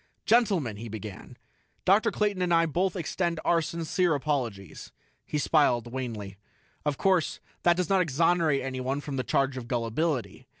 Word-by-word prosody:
"Gentlemen," 195 - +2
he 115 +2 -7
began, 105 -2 -8 0.5
"Dr. 200 +3 +4
Clayton 205 -3 0
and 180 -1 0
I 165 0 +5
both 175 +4 0
extend 170 -1 -2
our 170 -1 +3
sincere 170 +1 0
apologies." 120 - -3 0.4
He 150 - -2
smiled 130 -6 +2
wanly. 110 -7 -5 0.5
"Of 150 -2 -1
course, 185 -4 +1 0.2
that 175 0 +4
does 180 -2 0
not 195 -1 +3
exonerate 165 -2 +2
anyone 130 +1 -2
from 145 -2 -5
the 130 - 0
charge 135 0 0
of 120 -2 -6
gullibility. 120 - -2
150 Hz, 155 wpm, -28 LUFS, 125-175 Hz, 0.5 s, I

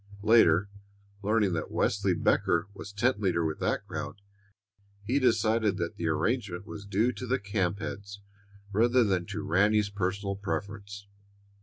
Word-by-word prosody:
Later, 105 -4 +5 0.5
learning 105 -2 +2
that 80 - -3
Wesley 100 -2 +1
Becker 85 +2 +2
was 100 0 -9
tent 110 +2 +1
leader 90 -4 +1
with 80 -1 -2
that - - -1
crowd, - - -6 0.8
he 125 +7 +1
decided 110 -4 +2
that 85 -3 -3
the 85 - -2
arrangement 95 +3 -1
was 100 -2 -9
due 105 +5 +2
to 125 0 -7
the 130 +2 +2
camp 100 -3 -1
heads 100 0 -7 0.5
rather 120 +4 +4
than 95 -5 0
to 105 0 -4
Ranny's 100 +2 +2
personal 100 0 -2
preference. 100 +2 -5
100 Hz, 145 wpm, -29 LUFS, 95-110 Hz, 0.8 s, Later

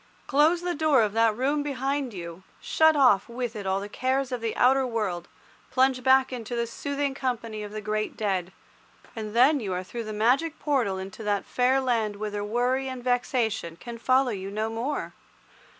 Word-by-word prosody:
Close 310 +5 +3
the 355 0 -1
door 295 -6 +3
of 210 -1 -1
that 225 -1 +3
room 285 +4 +1
behind 275 -1 -2
you, 170 -2 -8 0.2
shut 315 0 +3
off 250 -8 +4
with 240 -1 -4
it 205 -2 -5
all 190 +1 +1
the 200 - -6
cares 260 +4 -1
of 250 -2 -3
the 225 -1 -2
outer 265 +2 +4
world, 210 -8 -2 0.4
plunge 260 0 +2
back 265 +1 +4
into 240 -1 -5
the 235 0 0
soothing 280 +4 -3
company 235 -5 -3
of 205 -1 -7
the 215 0 -5
great 215 0 -2
dead, 190 -4 -1 0.6
and 215 -1 -6
then 275 +5 +5
you 205 -6 -4
are 180 +1 -3
through 230 +5 -6
the 215 - -5
magic 255 +10 +1
portal 250 -10 0
into 190 +3 -7
that 205 -2 -1
fair 255 +2 +2
land 230 -5 0
whither 205 0 -4
worry 245 +5 0
and 260 -2 -6
vexation 240 - 0
can 235 +5 -9
follow 255 +1 +3
you 195 -2 -5
no 215 +2 -2
more. 240 +6 -3
240 Hz, 190 wpm, -26 LUFS, 210-265 Hz, 0.6 s, then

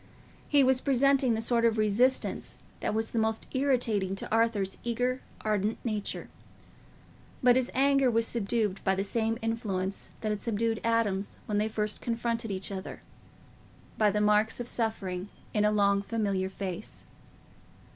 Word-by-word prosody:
He 285 -2 +5
was 260 0 +3
presenting 270 -2 +3
the 220 - -2
sort 235 0 +1
of 230 -1 +3
resistance 215 +5 +1 0.2
that 215 - -1
was 220 0 -1
the 230 - 0
most 220 0 0
irritating 240 -8 +1
to - - -7
Arthur's 225 -4 +1
eager 245 +2 -1 0.2
ardent 210 0 0
nature. 215 -3 -2 1.2
But 245 -1 +6
his 255 -1 +1
anger 275 0 +4
was 230 -1 +2
subdued 215 -3 -1
by 190 0 +2
the 195 - -1
same 225 +2 0
influence 200 -4 -2
that 215 - -1
had 210 - -3
subdued 225 0 -1
Adam's 220 -4 0
when 205 -1 0
they 215 +1 0
first 210 -1 -2
confronted 230 -1 -2
each 190 0 -3
other—by 200 +2 -6
the 210 +1 0
marks 210 +2 +3
of 240 - -4
suffering 205 -6 -1 0.2
in 210 -1 +2
a 210 - +4
long 200 -1 +3
familiar 200 -3 -1
face. 190 +1 -6
220 Hz, 150 wpm, -29 LUFS, 205-235 Hz, 1.2 s, But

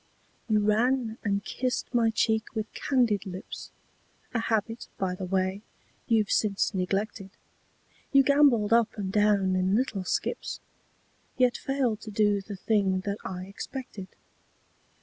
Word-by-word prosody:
You 215 -1 +3
ran 225 +2 +1
and 200 -1 -1
kissed 255 0 -2
my 235 -2 +4
cheek 220 0 0
with 215 -1 -3
candied 240 -8 +1
lips, 185 0 -7 0.6
A 235 - +1
habit, 225 0 -1
by 190 -2 -1
the 185 0 -5
way, 190 +1 0 0.5
you've 220 -3 +2
since 205 0 +1
neglected; 195 +2 -2 0.8
You 275 -1 +6
gambolled 265 -6 +4
up 230 -1 +3
and 195 -2 -3
down 205 -2 +3
in 185 +2 +2
little 220 -5 0
skips, 470 - -2 0.8
Yet 250 -1 +3
failed 255 -6 -1
to 220 - -8
do 205 -1 +2
the 200 +1 -7
thing 190 -1 +1
that 200 +1 -3
I 185 0 -5
expected. 200 0 -7
210 Hz, 135 wpm, -28 LUFS, 195-235 Hz, 0.8 s, You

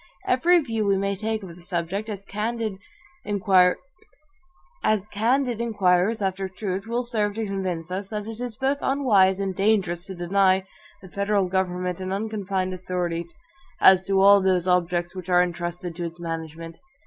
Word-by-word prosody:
Every 345 +8 +4
view 225 -7 -2
we 200 -1 +3
may 200 +1 -1
take 220 +1 -3
of 175 -3 -9
the 175 - -15
subject, 180 +4 -3
as 200 -2 -6
candid 215 -1 -3 0.4
inquirers 195 -3 +3 2.4
after 190 0 -2
truth, 195 +1 -4
will 240 +2 -1
serve 215 -4 -1
to 225 0 -2
convince 185 -4 -3
us, 190 +2 -3
that 210 0 -5
it 225 0 -7
is 245 -3 -4
both 275 +2 0
unwise 205 -9 +3
and 195 -1 -2
dangerous 195 -4 +1
to 190 - -7
deny 190 +2 +2 0.4
the 190 - -11
federal 200 -1 +1
government 180 -1 -2
an 185 0 -4
unconfined 195 -2 -2
authority, 175 -2 -3 0.5
as 190 0 +6
to 195 -1 +2
all 200 +1 +7
those 185 -2 +1
objects 175 -1 +1
which 185 -1 -7
are 180 0 +5
intrusted 175 0 -4
to 175 - -3
its 170 +1 -7
management. 165 0 -6
190 Hz, 155 wpm, -24 LUFS, 180-210 Hz, 2.4 s, all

